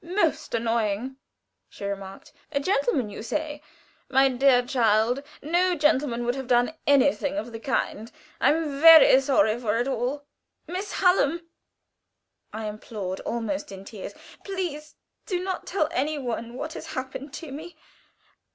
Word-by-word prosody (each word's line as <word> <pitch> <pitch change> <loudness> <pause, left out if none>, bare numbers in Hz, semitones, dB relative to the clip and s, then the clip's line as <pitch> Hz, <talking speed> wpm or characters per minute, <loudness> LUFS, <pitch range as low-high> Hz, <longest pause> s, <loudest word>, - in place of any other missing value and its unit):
"Most 335 - 0
annoying!" 230 +2 -1 0.5
she 200 - -9
remarked. 195 +2 -7 0.2
"A 280 - 0
gentleman, 275 - 0
you 200 - -7
say. 295 +5 -3 0.5
My 270 0 +4
dear 255 -1 +4
child, 235 0 +2 0.2
no 350 +4 +2
gentleman 275 -5 +1
would 245 - +1
have 265 -1 -6
done 245 +3 +3
anything 285 +1 +3
of 240 -6 -4
the 225 - -7
kind. 225 -2 -2 0.3
I - - +4
am 300 -3 -2
very 320 -5 +9
sorry 235 -5 +2
for 225 -2 0
it 240 +2 0
all." 270 +2 -2 0.4
"Miss 380 +3 -5
Hallam," 340 -3 +2 1.0
I 220 0 -5
implored, 210 -3 -5
almost 285 +6 -3
in 195 0 -9
tears, 205 -2 -8 0.3
"please 345 -6 -5 0.3
do 360 -3 -1
not 375 -1 -4
tell 350 -5 +1
any 305 -2 -1
one 235 -3 -4
what 310 +5 -5
has 320 - -8
happened 260 +1 -5
to 320 -4 -8
me. 320 +5 -9
270 Hz, 145 wpm, -25 LUFS, 230-310 Hz, 1.0 s, very